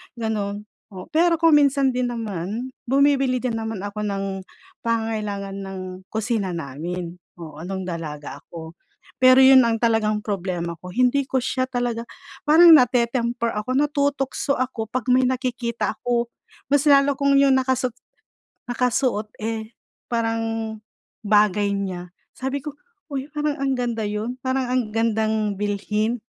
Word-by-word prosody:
ganun. 210 -3 -3 0.3
Oo, 185 -1 -9
pero 335 +1 +4
kung 330 -2 +5
minsan 275 -2 +3
din 250 -1 0
naman, 220 +2 -4 0.2
bumibili 270 -1 +3
din 240 -3 -1
naman 220 -3 -4
ako 210 +1 -4
ng 195 0 -2 0.6
pangangailangan 215 -4 -2
ng 195 -1 -6 0.3
kusina 220 -3 -1
namin, 170 +4 -5 0.2
oo, 155 -2 -9
nung 190 -1 -4
dalaga 150 -4 -6
ako. 160 -1 -9 0.5
Pero 255 0 +7
yun 265 0 +8
ang 230 -1 +1
talagang 220 -2 +2
problema 180 -5 -3
ko, 180 - -9
hindi 255 +5 +2
ko 265 - +1
siya 255 +1 -1
talaga 245 -2 -2 0.4
parang 325 +2 +8
nate-temper 235 -2 +2
ako, 210 +4 -4
natutukso 285 -1 0
ako 245 -4 -3
'pag 255 -2 -2
may 260 - +5
nakikita 245 -4 -1
ako. 235 +2 0 0.4
Mas 285 0 +3
lalo 280 0 +5
kung 280 0 +3
yung 275 -1 +5
nakasut 260 -2 0 0.8
nakasuot, 245 -3 0 0.2
eh, 220 0 -4 0.3
parang 225 -1 -2 0.5
bagay 205 -1 +3
niya. 180 -3 -4 0.3
Sabi 270 +1 -3
ko, 295 -1 -5 0.4
"Uy, 270 0 -3
parang 295 -1 -2
ang 270 -1 +1
ganda 235 -3 -2
yun. 220 +5 -4
Parang 260 0 -1
ang 250 -4 0
gandang 220 -2 0
bilhin." 210 +3 -1
230 Hz, 135 wpm, -23 LUFS, 205-260 Hz, 0.8 s, yun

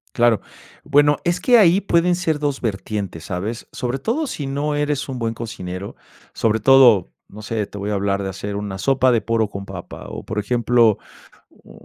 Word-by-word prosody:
Claro. 120 -3 +3 0.4
Bueno, 145 +1 +3
es 175 +1 0
que 245 -1 +5
ahí 190 -2 +5
pueden 175 -2 +2
ser 160 -4 -1
2 145 -2 -1
vertientes, 100 -5 -4
¿sabes? 100 +6 -4
Sobre 125 +2 -3
todo 240 - -1
sí 150 - -5
no 145 +2 -2
eres 145 -1 -1
un 130 -2 -4
buen 115 0 -1
cocinero, 100 -4 -6 0.4
sobre 110 0 +1
todo, 120 -5 +5 0.2
no 105 +2 -11
sé, 110 0 -2
te 100 - -10
voy 100 +1 -3
a - - 0
hablar 100 0 0
de - - -2
hacer 100 +2 -5
1 100 -2 -5
sopa 130 +2 +3
de 115 - +3
poro 115 +1 0
con 100 0 -7
papa 95 -3 -9
o, - - -7
por 105 - -3
ejemplo, 120 0 +2 0.6
mm, - - -19
115 Hz, 190 wpm, -21 LUFS, 100-145 Hz, 0.6 s, que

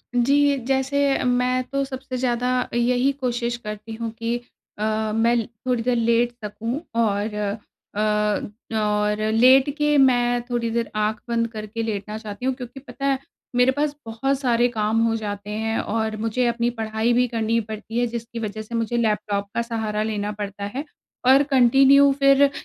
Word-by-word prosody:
जी, 280 +4 +4
जैसे 270 +1 +1
मैं 250 0 +1
तो 275 +2 -2
सबसे 260 -1 -6
ज़्यादा 250 0 0
यही 245 +3 +2
कोशिश 240 -3 -2
करती 215 -1 -7
हूँ 230 0 -4
कि 230 +1 -1 0.4
अ, 215 0 0
मैं 230 0 +2 0.2
थोड़ी 250 -2 +1
देर 250 +1 +1
लेट 235 +1 +2
सकूँ 230 +7 -4 0.2
और 210 -1 0 0.6
अ, - - -2 0.8
और 210 0 +1
लेट 260 +4 +6
के 295 -1 +2
मैं 245 -2 +3
थोड़ी 240 -1 -1
देर 230 0 -1
आँख 215 0 0
बंद 230 0 +1
करके 215 +1 -5
लेटना 210 -1 -4
चाहती 220 +2 -7
हूँ 265 - +2
क्योंकि 250 +1 -8
पता 275 0 -7
है, 275 -1 +2 0.4
मेरे 245 +1 +5
पास 290 +2 -1
बहुत 260 +5 -1
सारे 240 -3 +2
काम 220 -1 0
हो 225 - +1
जाते 205 -2 -5
हैं 220 +1 -1
और 220 0 -1
मुझे 225 +3 0
अपनी 235 0 +1
पढ़ाई 225 0 -1
भी 250 +1 +3
करनी 230 -1 0
पड़ती 220 +2 -5
है, 245 - +2
जिसकी 235 0 -6
वजह 215 -1 -4
से 220 +2 -7
मुझे 230 +1 -1
लैपटॉप 210 -3 0
का - - +1
सहारा 220 -2 -2
लेना 210 -1 -2
पड़ता 205 -1 -6
है 285 - -3 0.4
और 270 +2 +7
कन्टिन्यू 275 +1 +5
फिर 275 0 +5
अ, 280 - +4
235 Hz, 170 wpm, -23 LUFS, 220-255 Hz, 0.8 s, और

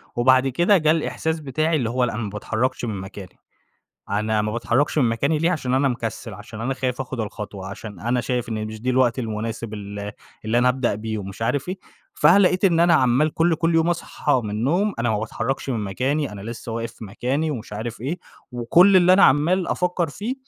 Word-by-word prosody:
وبعد 130 +2 +4
كده 175 - +3
جه 155 -3 +3
الإحساس 160 0 -1
بتاعي 155 +3 0
اللي 125 -7 0
هو 125 +2 0
لأ، 120 - 0
أنا 110 - -3
ما 105 - -3
باتحرّكش 110 +5 -2
من 110 -3 -3
مكاني، 95 -1 -10 0.7
أنا 105 +1 +1
ما 105 0 -2
باتحرّكش 120 +6 0
من 125 -5 +4
مكاني 140 +7 0
ليه؟ 165 +3 +2
عشان 130 -8 -1
أنا 135 +1 +3
مكسِّل، 115 -2 -4
عشان 110 +2 -10
أنا 130 +4 -1
خايف 130 -1 -2
آخُد 130 -2 -4
الخطوة، 105 -2 -6
عشان 100 -1 -8
أنا 120 +4 0
شايف 125 -1 -2
إن 110 -2 -3
د - - -6
مش 110 0 -8
دي 125 +3 -1
الوقت 125 -1 +2
المناسب 115 -1 -4
ال 100 0 -6 0.3
اللي 110 +2 +1
أنا 125 +1 +4
أبدأ 125 -3 +1
بيه 110 +1 -4
ومش 100 +1 -7
عارف 140 +7 -1
إيه. 185 +1 -4 0.4
فلقيت 185 +4 +4
إن 170 -4 +4
أنا 170 0 +5
عمّال 135 +2 +3
كل 165 +1 +3
كل 165 +1 0
يوم 165 +1 +3
أصحى 150 -5 0
من 105 - -4
النوم، 160 - +1
أنا 115 0 +1
ما 105 - 0
باتحرّكش 115 +5 -3
من 115 -4 -1
مكاني، 130 +6 -1
أنا 100 - -8
لسّه 115 +2 -7
واقف 115 0 -4
في - - -11
مكاني 130 +9 -2
ومش 120 -7 -6
عارف 110 +2 -5
إيه، 145 +9 -3 0.3
وكل 170 +11 +5
اللي 180 0 +6
أنا 190 +1 +7
عمّال 170 +6 +3
أفكر 180 -1 0
فيه، 210 - -4
125 Hz, 215 wpm, -22 LUFS, 110-155 Hz, 0.7 s, أنا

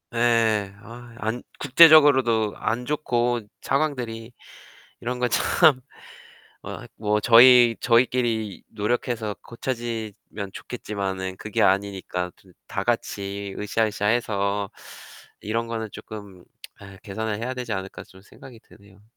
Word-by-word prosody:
예. 115 -4 +2
아이 120 +1 -12
안 115 +2 -3 0.2
국제적으로도 135 -8 +6
안 125 +2 -2
좋고 120 -5 0 0.2
상황들이. 125 -6 -2 0.7
이런 125 +1 -4
거 125 - +1
참 150 +2 +3 0.9
어 - - -7
아이 - - -11
뭐 105 0 0
저희 120 +1 +7
저희끼리 115 -3 +1
노력해서 110 0 -2
고쳐지면 115 -5 -6
좋겠지만은 95 -5 -5
그게 105 +2 -4
아니니까 95 -2 0
좀 95 - -22 0.2
다 - - -3
같이 100 0 -3
으쌰, 110 +2 0
으쌰 105 -1 -3
해서 100 -3 0 0.7
이런 115 +2 -2
거는 115 -1 -4
쪼끔 100 -4 -10 0.3
아이 100 -1 -12
개선을 110 0 -4
해야 125 +2 -3
되지 125 -3 -5
않을까 95 -1 -6
좀 95 0 -18
생각이 115 +3 -15
드네요. 100 -2 -20
110 Hz, 265 characters per minute, -24 LUFS, 100-120 Hz, 0.9 s, 저희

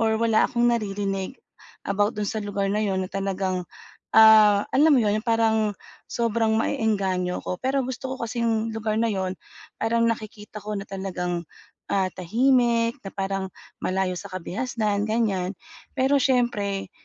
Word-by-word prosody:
or 220 -1 +2
wala 225 -1 +3
akong 240 -1 +1
naririnig 200 -1 -2 0.5
about 205 +2 0
do'n 210 - -2
sa 220 - -2
lugar 200 -1 -2
na 210 - 0
'yon 190 -2 0
na - - -9
talagang, 190 -1 -1 0.5
ah, 215 -2 +8
alam 300 +3 +5
mo 250 - +4
'yon 210 +1 +1
parang 220 -2 +2 0.3
sobrang 230 -1 +1
maeengganyo 195 -5 0
ko, 180 - -4
pero 265 0 0
gusto 260 +1 -5
ko - - -4
kasing 225 -1 -1
lugar 220 -1 -2
na 230 - +2
'yon 190 -1 -2 0.5
parang 230 +1 +1
nakikita 215 -1 -5
ko 210 0 -3
na 195 - -4
talagang, 180 -3 -3 0.5
ah, 190 -1 +2
tahimik, 235 +3 +2
na - - -5
parang 195 0 -2 0.4
malayo 185 0 0
sa - - -8
kabihasnan, 210 +2 -2
ganyan. 205 -4 0 0.4
Pero 270 +1 +3
siyempre, 240 -7 0
215 Hz, 150 wpm, -24 LUFS, 195-230 Hz, 0.5 s, ah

